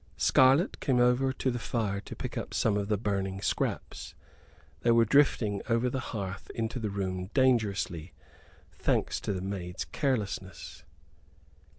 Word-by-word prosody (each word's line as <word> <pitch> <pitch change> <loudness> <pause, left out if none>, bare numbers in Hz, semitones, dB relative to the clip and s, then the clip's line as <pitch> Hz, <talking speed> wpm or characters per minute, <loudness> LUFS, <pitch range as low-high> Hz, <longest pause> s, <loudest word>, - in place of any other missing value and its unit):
Scarlett 135 +6 +4
came 130 -4 +1
over 125 +2 +3
to 130 0 -1
the 120 - -3
fire 105 -5 -1
to - - -9
pick - - -5
up - - -4
some 110 -3 +2
of 100 -1 -1
the 105 -1 +1
burning 95 -2 -2
scraps. - - -3 0.6
They 120 - 0
were 115 0 +5
drifting 110 -6 +3
over 120 +2 +2
the 130 - -2
hearth 100 -6 -5
into 115 +2 -2
the 110 -2 -2
room 95 -2 -3
dangerously, 100 - +1 0.6
thanks - - 0
to - - -2
the 95 -2 -2
maid's 90 -3 -4
carelessness. 95 - -3
105 Hz, 150 wpm, -29 LUFS, 95-125 Hz, 0.6 s, were